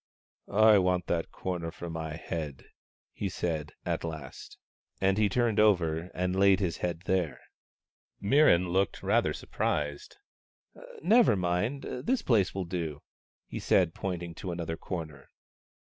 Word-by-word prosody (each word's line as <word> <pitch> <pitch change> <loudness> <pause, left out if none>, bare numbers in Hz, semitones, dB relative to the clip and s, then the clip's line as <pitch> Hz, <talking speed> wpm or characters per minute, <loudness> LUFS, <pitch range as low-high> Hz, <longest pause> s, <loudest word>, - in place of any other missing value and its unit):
" - - -53 0.2
I 105 - +7
want 90 -1 +1
that 85 -1 -1
corner 90 -3 -4
for 85 +1 -8
my 80 -1 -4
head," 80 -4 -5 0.5
he 100 - -3
said, 80 -5 -3
at - - -1
last. 80 -5 -7 0.4
And 95 0 +3
he 105 -1 +3
turned 115 +1 +1
over 85 -5 +3
and 90 0 -1
laid 95 0 +5
his 90 -5 -1
head 85 -2 -3
there. 90 -4 -1 0.8
Mirran 100 - +4
looked 95 +1 0
rather - - +2
surprised. 75 -1 -3 0.4
" - - -15
Never 230 - +5
mind; 95 +9 -1
this 235 - -2
place 105 -7 +2
will 95 -2 -2
do," 85 -4 -4 0.4
he - - -6
said, 90 -3 +3
point 90 -3 -3
ing 85 -1 -7
to 95 - -4
another 85 -1 -3
corner. 80 -5 -7
90 Hz, 150 wpm, -29 LUFS, 80-100 Hz, 0.8 s, I